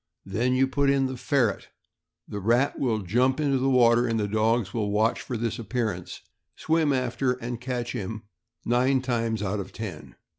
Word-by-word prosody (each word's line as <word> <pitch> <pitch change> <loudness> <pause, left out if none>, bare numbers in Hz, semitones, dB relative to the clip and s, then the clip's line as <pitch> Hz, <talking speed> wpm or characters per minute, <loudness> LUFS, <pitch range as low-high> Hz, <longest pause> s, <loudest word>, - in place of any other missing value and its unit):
Then 125 +4 0
you 135 +1 +3
put 140 +1 +1
in 135 -1 +3
the 130 0 -3
ferret, 125 - 0 0.6
the 105 - -5
rat 120 +7 +1
will 110 -5 0
jump 125 - +2
into 140 -3 +1
the 135 +1 +1
water, 120 -1 +4
and 115 -1 0
the 105 - 0
dogs 110 -1 +1
will 105 -3 -1
watch 110 +3 +1
for 125 - -4
nis 115 0 -2
appearance, 110 -6 -3 0.3
swim 160 -2 +1
after 130 0 0
and 120 -1 -6
catch 125 -1 -3
him, 110 +2 -5 0.4
nine 130 +2 +2
times 115 -4 -1
out 100 +1 -1
of 95 - -6
ten. 95 -8 -8
120 Hz, 180 wpm, -26 LUFS, 110-130 Hz, 0.6 s, water